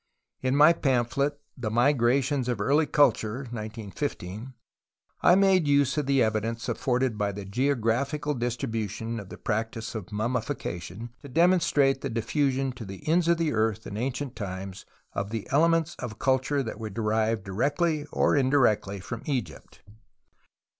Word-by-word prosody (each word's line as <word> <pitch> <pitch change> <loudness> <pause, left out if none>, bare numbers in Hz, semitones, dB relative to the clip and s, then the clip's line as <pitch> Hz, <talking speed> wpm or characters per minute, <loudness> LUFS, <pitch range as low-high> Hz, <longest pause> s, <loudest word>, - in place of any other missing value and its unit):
In 130 +1 +1
my 150 +3 +7
pamphlet 140 0 0 0.2
Tfie 115 -3 -2 0.3
JMigrations 130 +2 +1
of 120 -4 -1
Early 145 +8 +2
Culture 135 -5 +2
(1915) 110 +1 -5 0.7
I 175 - +6
made 190 -4 +4
use 140 -2 +3
of 150 -3 -1
the 135 -2 +4
evidence 110 +1 -1
afforded 125 -3 0
by 105 -1 +1
the 100 0 -7
geographical 135 +6 0
distribution 115 -3 -3
of 100 -3 -10
the - - -9
practice 110 +1 -3
of 110 -3 -6
mummification 110 -3 -3
to 140 - -10
demonstrate 160 -4 +3
the 140 - -3
diffusion 135 +3 0
to 125 -2 -9
the 95 +4 -9
ends 165 +2 +3
of 170 0 +4
the 165 -2 0
earth 110 0 0
in 100 - -6
ancient 130 +3 -3
times 95 -2 -6 0.3
of 100 +1 -3 0.2
elements 165 +2 +3
of 110 -3 -6
culture 135 +2 +1
that 115 - -6
were 110 -1 -4
derived 110 0 0
directly 145 - 0
or - - +2
indirectly 130 -8 +2
from 95 - -6
Egypt. 120 - -4
125 Hz, 145 wpm, -27 LUFS, 110-145 Hz, 0.7 s, my